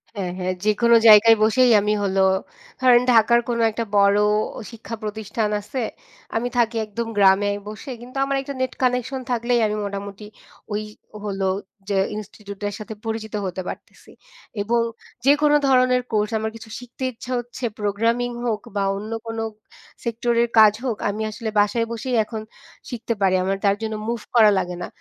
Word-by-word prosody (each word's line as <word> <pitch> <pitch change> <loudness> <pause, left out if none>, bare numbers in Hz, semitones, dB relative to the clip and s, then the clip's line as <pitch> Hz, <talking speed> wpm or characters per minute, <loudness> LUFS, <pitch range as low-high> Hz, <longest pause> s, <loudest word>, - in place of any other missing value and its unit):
হ্যাঁ, 185 -3 -3
হ্যাঁ 185 0 -1
যেকোনো 235 +2 +4
জায়গায় 220 +1 +9
বসেই 245 +3 +4
আমি 210 +1 +1
হল, 195 0 -1 0.6
ধরেন 245 -1 +6
ঢাকার 235 +1 +5
কোন 235 - 0
একটা 230 +2 -3
বড় 200 0 +5 0.5
শিক্ষা 230 0 -7
প্রতিষ্ঠান 215 0 -2
আছে। 250 +5 -4 0.5
আমি 235 +2 0
থাকি 230 -1 +2
একদম 225 +2 -4
গ্রামে 200 +1 +5 0.2
বসে 215 +6 -7
কিন্তু 255 +2 -10
আমার 275 0 -1
একটা 280 +1 -6
নেট 260 - -1
কানেকশন 250 +1 0
থাকলেই 240 0 +1
আমি 210 - -2
মোটামুটি 200 +1 -6 0.5
ওই 210 - -1 0.4
হল 195 -2 -4 0.5
যে 195 - +1 0.2
ইনস্টিটিউট 205 -1 -9
এর - - -8
সাথে 220 +1 -7
পরিচিত 220 -1 -4
হতে 185 0 -4
পারতেছি। - - -10 0.5
এবং 230 +3 +1 0.4
যেকোন 295 +1 +4 0.2
ধরনের 255 -1 +4
কোর্স 210 0 0
আমার 220 0 -3
কিছু 225 -1 -11
শিখতে 250 +1 -10
ইচ্ছা 245 +2 -10
হচ্ছে 245 +1 -9 0.2
প্রোগ্রামিং 230 +4 0
হোক 220 -3 -1
বা 200 - +1
অন্য 215 +2 -7 0.2
কোনো 225 0 -3 0.6
সেক্টরের 235 0 +1
কাজ 210 -1 +8
হোক 230 -4 -1
আমি 210 +2 -3
আসলে 220 +1 -5
বাসায় 220 +3 +2
বসেই 240 +2 -2
এখন 220 0 -6 0.5
শিখতে 235 -1 -3
পারি 190 -1 +3
আমার 195 +1 0
তার 200 0 +4
জন্য 220 -1 -3
মুভ 235 -2 -2
করা 215 -3 +7
লাগে 180 -1 -2
না। - - -4
225 Hz, 165 wpm, -22 LUFS, 205-240 Hz, 0.6 s, জায়গায়